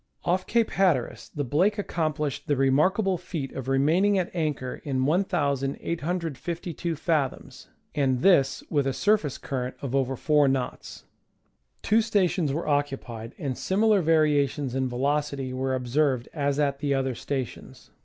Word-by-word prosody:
Off 185 +2 0
Cape 230 -1 +2
Hatteras 130 - +1
the 145 - -3
Blake 180 - +2
accomplished 155 -7 -2
the 145 - +2
remarkable 175 +9 +2
feat 160 -6 -5
of 130 -1 -6
remaining 160 +10 +3
at 180 -2 -1
anchor 150 -7 -2
in 130 -2 0
1,852 165 +2 -1
fathoms, 155 -4 -2 0.3
and 130 -3 +1
this 135 -8 +4
with 145 -3 +1
a 135 - 0
surface 200 -5 +1
cui 135 - -4
rent 125 +1 -4
of 135 -3 -5
over 135 -1 +1
4 150 +2 +3
knots. 130 -2 -3 0.8
Two 220 +2 +4
stations 190 -8 +1
were 160 +5 -3
occupied, 135 -6 -2
and 135 -3 -3
similar 210 - +2
variations 150 -4 +2
in 130 -1 0
velocity 140 +1 -1
were 130 0 -1
observed 130 0 0
as 140 -2 0
at 140 -2 0
the 140 -1 0
other 135 -1 0
stations. 130 0 -6
145 Hz, 145 wpm, -26 LUFS, 135-170 Hz, 0.8 s, this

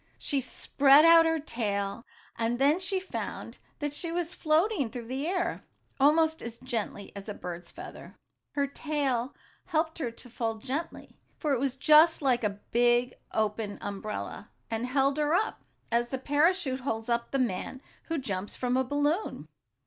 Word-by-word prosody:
She 280 -3 0
spread 275 +3 +5
out 330 0 +8
her 325 0 +1
tail, 205 -6 -2 0.3
and 230 +1 0
then 285 +6 +4
she 380 +1 0
found 375 - -6 0.2
that 290 -1 -3
she 330 +3 -4
was 340 0 -2
floating 315 - +2
through 240 0 -7
the 265 +5 -3
air 365 0 -1 0.4
almost 315 +3 +4
as 235 -1 -7
gently 230 -5 -4
as 200 +2 -7
a 205 - -4
bird's 175 -1 -7
feather. 365 +2 -10 0.4
Her 285 -1 +1
tail 280 -3 -1 0.3
helped 320 -1 -1
her 260 -6 -1
to 230 +2 -12
fall 225 -1 -2
gently, 270 +9 -5 0.2
for 300 -3 0
it 260 - +1
was 270 -1 -1
just 310 +3 +6
like 250 -3 +2
a 205 -1 -1
big, 240 +1 +3 0.2
open 210 -1 -1
umbrella, 205 +1 -5 0.2
and 225 +2 -1
held 275 +2 +2
her 300 +2 +2
up, 435 +4 0 0.3
as 235 +1 +2
the 265 - -3
parachute 290 +1 +2
holds 225 -4 -3
up 235 0 0
the 275 - -1
man 255 +1 -2 0.3
who 330 - -2
jumps 205 -7 -3
from 250 0 0
a 260 - +3
balloon. 290 - -1
265 Hz, 165 wpm, -29 LUFS, 230-310 Hz, 0.4 s, out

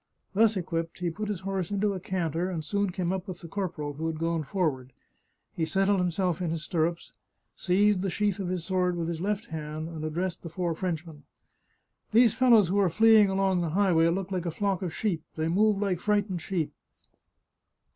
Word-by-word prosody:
Thus 220 +1 +4
equipped, 165 -2 -3
he 175 -2 -2
put 210 +5 -4
his 200 -5 -3
horse 190 -2 -2
into 205 0 0
a 190 - -4
canter, 175 -1 -2
and 165 -4 -4
soon 200 +4 0
came 180 0 -2
up 190 +1 -4
with 180 -2 -7
the 170 - -8
corporal, 165 -5 -4
who 160 +3 -3
had 160 -1 -3
gone 165 0 0
forward; 145 -6 -2 0.6
he 165 - -2
settled 195 +4 +2
himself 180 0 0
in 175 - -1
his 160 -1 -3
stirrups, 170 +1 -1 0.4
seized 195 +1 +2
the 195 - -1
sheath 205 +1 0
of 190 - -2
his 180 -2 -3
sword 180 -2 +1
with 165 -1 -2
his 165 -1 -3
left 210 +3 -1
hand, 155 0 -5
and 160 -2 -7
addressed 170 +3 -2
the 170 - -7
four 170 0 -2
French 175 -1 -3
men. 155 -3 -12 0.5
" - - -46
These 230 -1 +6
fellows 235 -8 +5
who 200 +2 +2
are 195 -3 +4
fleeing 220 +2 +6
along 190 -1 +1
the 170 - -1
highway 175 -5 +4
look 190 +3 -1
like 180 -2 -2
a - - +1
flock 195 +2 -1
of 180 -3 -2
sheep; 180 -3 -1
they 160 0 -1
move 205 +4 +3
like 195 -4 0
frightened 205 -3 0
sheep 170 -3 -2
180 Hz, 205 wpm, -28 LUFS, 165-195 Hz, 0.6 s, These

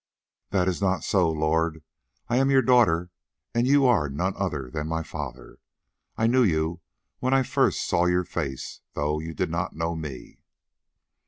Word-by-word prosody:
"That 95 -2 +1
is 95 +1 -1
not 95 -4 +1
so, 90 -4 +2
lord. 80 0 0 0.4
I 120 - +1
am 135 +1 +3
your 135 -1 +4
daughter, 90 -9 +3 0.4
and 120 +1 +2
you 140 0 +5
are 100 - +3
none 90 +8 -1
other 75 -10 -3
than 75 -1 -3
my 80 0 -2
father. 70 -6 -8 0.6
I 110 - +1
knew 125 +3 +4
you 85 -4 +1 0.4
when 130 +1 +1
I 135 - +4
first - - +1
saw 85 - +2
your 90 +1 +2
face, 65 -6 -5
though 75 +1 -1
you 80 +1 -6
did - - -1
not - - -2
know 85 +1 -2
me." 75 -5 -8
85 Hz, 170 wpm, -26 LUFS, 80-110 Hz, 0.6 s, you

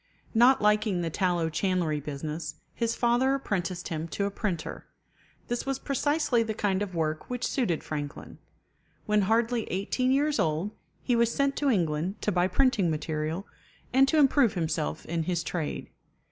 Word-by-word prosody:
Not 245 +1 +5
liking 210 -3 +3
the 165 -1 -2
tallow 175 -2 +1
chandlery 165 -2 0
business, 150 +2 -5 0.2
his 230 -1 -1
father 245 +3 +2
apprenticed 185 -8 -3
him 160 0 -3
to 200 +4 -2
a 200 - -1
printer. 190 -6 -4 0.6
This 240 0 -2
was 270 -1 0
precisely 290 -2 +1
the 220 -1 -2
kind 200 -2 0
of 195 -3 -3
work 155 -1 -2
which 250 0 -2
suited 220 - 0
Franklin. 145 -2 -6 0.7
When 210 0 +3
hardly 230 0 +2
eighteen 230 +7 0
years 290 +2 +2
old, 160 +6 0 0.3
he 245 - +2
was 235 0 +3
sent 280 +1 +1
to 285 - +2
England 175 - 0
to 210 - +1
buy 180 -1 +2
printing 230 -3 +2
material, 155 +3 -2 0.5
and 270 +1 +6
to 315 - +2
improve 270 -6 +4
himself 160 - -2
in 165 0 -1
his 175 -1 -1
trade. 160 -3 -4
200 Hz, 160 wpm, -28 LUFS, 165-240 Hz, 0.7 s, and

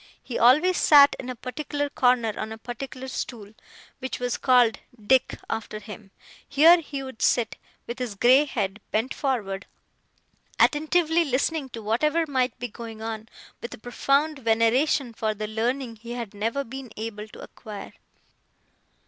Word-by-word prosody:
He 245 - -4
always 305 +10 +5
sat 285 -2 +7
in 255 - -6
a 255 - -4
particular 290 +4 -4
corner, 245 -5 +2
on 220 - -5
a 220 - -6
particular 255 +3 -7
stool, 225 -5 -6 0.5
which 260 0 -5
was 245 -1 -1
called 245 -4 +3 0.2
'Dick', 250 +5 +2
after 220 -1 -4
him; 210 -1 -10 0.4
here 325 +5 +7
he 280 -3 -6
would 260 -4 -9
sit, 240 -2 +2 0.3
with 240 +2 -6
his 245 -5 -4
grey 255 +8 +5
head 210 -6 -3
bent 225 +5 -1
forward, 205 -8 -2 0.9
attentively 325 +2 +3
listening 280 +1 -1
to 230 -3 -8
whatever 300 +10 +1
might 260 -3 0
be 245 0 -4
going 225 -1 -9
on, 225 0 -5 0.3
with 235 - -6
a - - -19
profound 275 +6 0
veneration 235 +3 +2
for 220 -1 -2
the 215 +1 -4
learning 230 +2 -2
he 235 +2 -8
had 235 -4 -6
never 225 +7 -2
been 265 0 -8
able 215 -1 -5
to - - -14
acquire. 210 -3 -9
245 Hz, 155 wpm, -25 LUFS, 220-275 Hz, 0.9 s, sat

